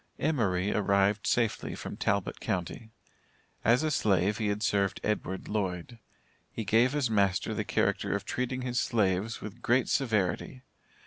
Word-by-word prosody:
Emory 105 - +1
arrived 100 0 +2
safely 115 -3 0
from - - -6
Talbot - - -1
county. 95 +5 -3 0.7
As 120 +6 +4
a 155 - +1
slave, 100 - +2
he 110 - 0
had 105 +1 -1
served 100 -2 +1
Edward 95 -3 -2
Lloyd. 100 +2 -3 0.5
He 110 - -5
gave 115 +6 +3
his 145 -3 +1
master 100 -3 +1
the - - -2
character - - 0
of 100 - -4
treating 125 0 -2
his 125 -1 -1
slaves 105 -2 0
with 110 +3 -8
great 120 +2 +2
severity. 115 +1 0
105 Hz, 145 wpm, -29 LUFS, 100-120 Hz, 0.7 s, As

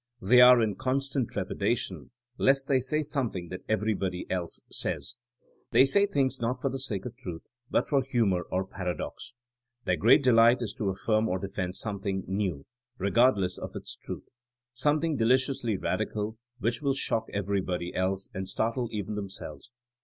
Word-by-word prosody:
They 120 +4 +6
are 125 -1 +8
in 105 -3 -1
constant 135 -1 -1
trepidation - - -2 0.3
lest 135 0 +3
they 135 -2 +3
say 150 +5 0
something 120 - -2
that 90 0 -6
everybody 105 -4 -1
else 90 -2 -2
says. - - -3 0.6
They 130 - +6
say 200 +9 +4
things 135 -7 0
not 125 +2 -1
for 135 - 0
the 135 - -4
sake 105 -8 -2
of 120 -1 -6
truth 90 -10 -7 0.3
but - - +1
for 140 -2 +3
humor 115 -9 +1
or 95 +1 0
paradox. 95 +6 -5 0.5
Their 90 -1 +1
great 115 - +5
delight 120 0 +5
is 105 -2 -4
to 100 - 0
affirm 110 +3 +1
or 90 - 0
defend 95 -1 -4
some 105 -2 -3
thing 95 -1 -2
*'new'' 95 -7 -2 0.3
regardless 100 -2 +2
of - - -7
its - - -5
truth; - - -8 0.5
something 150 +4 +1
deliciously 125 -2 +2
radical 105 +3 -2 0.2
which 115 0 -1
will 140 -2 +1
shock 115 -4 0
everybody 95 -3 -2
else 95 +1 -1
and 95 0 -4
startle 115 +4 -1
even 105 -1 -3
themselves. 100 +3 -7
110 Hz, 160 wpm, -28 LUFS, 95-130 Hz, 0.6 s, are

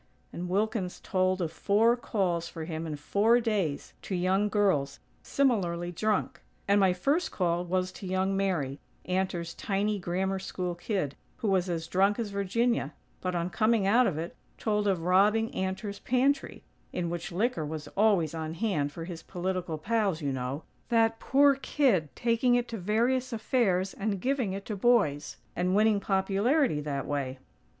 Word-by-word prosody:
and 175 +1 -5
Wilkins 200 -1 -1
told 185 -1 0
of 160 - -2
four 215 +7 +3
calls 180 -8 -1
for 160 -2 -6
him 160 0 -4
in 155 - -3
four 205 +11 +3
days, 205 -11 -1
to 190 - -4
young 190 +3 +1
girls, 185 -10 +1 0.2
similarly 175 -10 0
drunk. 215 +5 -1 0.3
"And 200 +1 +4
my 190 -2 +5
first 280 - 0
call 175 -2 0
was 185 +1 -1
to 190 - -9
young 190 +1 0
Mary 165 -9 -1 0.3
Antor's 180 -2 -1
tiny 205 0 -1
Grammar 190 +2 -1
School 180 -1 -3
kid, 175 - -2 0.2
who 220 - -1
was 190 -1 +1
as 165 -2 -2
drunk 195 +4 +2
as 225 -4 -3
Virginia; 220 +5 0 0.3
but, 180 -1 -2
on 175 +1 -1
coming 220 -1 +2
out 235 +5 +5
of 160 - -2
it, 165 +2 -5 0.2
told 210 -1 0
of 185 -4 +1
robbing 205 +5 +3
Antor's 190 +2 -3
pantry, 265 +3 0 0.3
in 170 -2 -2
which 175 +2 -4
liquor 205 0 0
was 150 0 -5
always 195 -7 +2
on 160 0 -4
hand 165 -8 0
for 165 +2 -7
his 170 -2 -7
political 180 -2 -3
pals, 200 0 0
you 140 -4 -2
know; 130 +4 -4 0.3
that 225 -1 +3
poor 280 +1 +5
kid 255 - +1
taking 240 +1 +2
it 245 0 +1
to 230 - -4
various 235 +7 +1
affairs 215 -5 +1
and 200 -1 -2
giving 255 -4 0
it 195 +1 -6
to 215 - -4
boys; 190 -10 +2 0.2
and 180 +2 +1
winning 215 0 +4
'popularity' 195 - +1
that 140 -2 -3
way." 135 -3 -3
190 Hz, 165 wpm, -29 LUFS, 170-220 Hz, 0.3 s, my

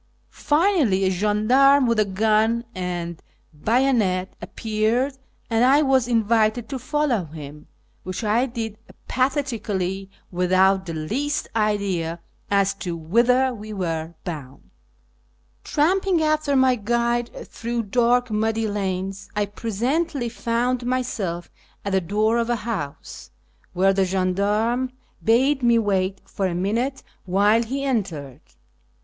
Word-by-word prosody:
Finally, 300 - +2
a 190 - +2
gendarme 230 +8 +4
with 230 -2 +2
a 215 - +4
gun 220 +4 +1
and 175 -2 -4 0.3
bayonet 210 - +1
appeared, 225 +5 -1 0.3
and 230 0 +2
I 275 +4 +5
was 265 -3 +3
invited 225 0 +2
to 270 -2 -4
follow 255 - 0
him, 150 -1 -10 0.3
which 185 +5 -5
I 225 +5 +2
did 225 -3 -5 0.3
apathetically, 220 -8 -1 0.2
without 185 +1 +2
the 165 - -4
least 265 - -2
idea 200 -6 0 0.3
as 200 0 +2
to 175 -2 -3
whither 245 +10 +2
we 215 -1 -8
were 165 -3 -3
bound. 145 -6 -8 0.9
Tramping 360 +2 +2
after 305 -2 +1
my 260 -1 +5
guide 235 +1 0 0.2
through 235 0 -3
dark 245 +2 +2
muddy 220 +1 0
lanes, 195 -1 -3
I 210 0 +1
presently 240 - -2
found 240 +2 -1
myself 225 -9 -2 0.3
at 200 - -1
the 190 0 +2
door 215 +6 +1
of 235 0 -1
a 240 - +2
house, 170 -12 -5 0.4
where 190 +2 +3
the 195 0 +2
gendarme 205 +7 0 0.3
bade 260 +5 +3
me 235 -1 +4
wait 195 -3 0
for 195 - -2
a 175 - -3
minute 230 +9 -1 0.2
while 205 +4 +3
he 265 +4 -3
entered. 165 - -3
220 Hz, 125 wpm, -23 LUFS, 190-250 Hz, 0.9 s, I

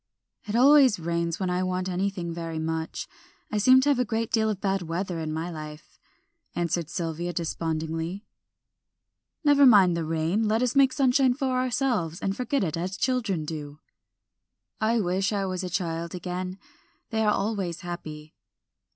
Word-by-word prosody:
"It 210 0 -3
always 265 -2 +6
rains 170 0 -2
when 185 -2 -1
I 180 +1 0
want 185 0 -1
anything 185 -2 -2
very 165 -1 -5
much. 160 0 -3 0.4
I 210 - 0
seem 255 +5 +6
to 285 - +2
have 280 -3 +3
a - - +4
great 230 -2 -2
deal 220 -2 +2
of 210 -3 -2
bad 195 -1 0
weather 175 +1 -3
in 155 -1 -3
my 160 +3 -3
life," 155 -1 -10 0.6
answered 170 -2 -1
Sylvia, 170 +1 -3
despondingly. 165 +2 -3 1.2
"Never 290 -1 +5
mind 200 -9 +7
the 170 - -1
rain; 165 +7 0
let 220 +3 +2
us 250 +1 0
make 275 -1 +5
sunshine 260 -1 +3
for 270 -1 -1
ourselves, 245 - 0
and 195 0 -2
forget 250 +1 -1
it 160 -5 -1
as 180 +3 -3
children 220 -11 0
do." 150 -2 -6 1.0
"I 225 +2 +2
wish 190 +1 0
I 200 -2 -1
was 185 0 -3
a 180 - -3
child 170 -1 -3
again, 180 +1 -4 0.5
they 220 0 0
are 210 - +3
always 195 -5 -2
happy." 155 -3 -7
185 Hz, 165 wpm, -26 LUFS, 165-220 Hz, 1.2 s, mind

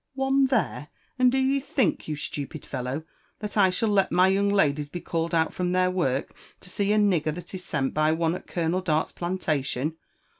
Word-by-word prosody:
'•One 270 0 +3
there?— 220 - 0 0.3
and 250 -1 +5
do 265 - +1
you 270 +1 +2
think, 260 - 0
you 155 - -2
stupid 150 +1 -6
feHoWt 130 +3 -4 0.3
that 210 -1 -6
I 195 -3 +5
shall 200 +5 0
let 200 -2 +2
my 185 +1 +5
young 200 +1 +2
ladies 150 -7 +2
be 175 - -5
called 170 0 -2
out 160 -1 +1
from 180 -1 -1
their 185 0 +3
work 140 -7 -1 0.3
to 180 - -12
see 200 +1 0
a 215 - +3
nigger 175 -7 +2
that 175 +1 -9
is 185 -1 -6
sent 135 -5 -1
by 155 +1 +2
onE 165 0 +1
at 185 - -7
Colonel 170 +1 -1
Dart's 160 -4 0
plantation? 155 -4 -2
180 Hz, 200 wpm, -26 LUFS, 155-200 Hz, 0.3 s, and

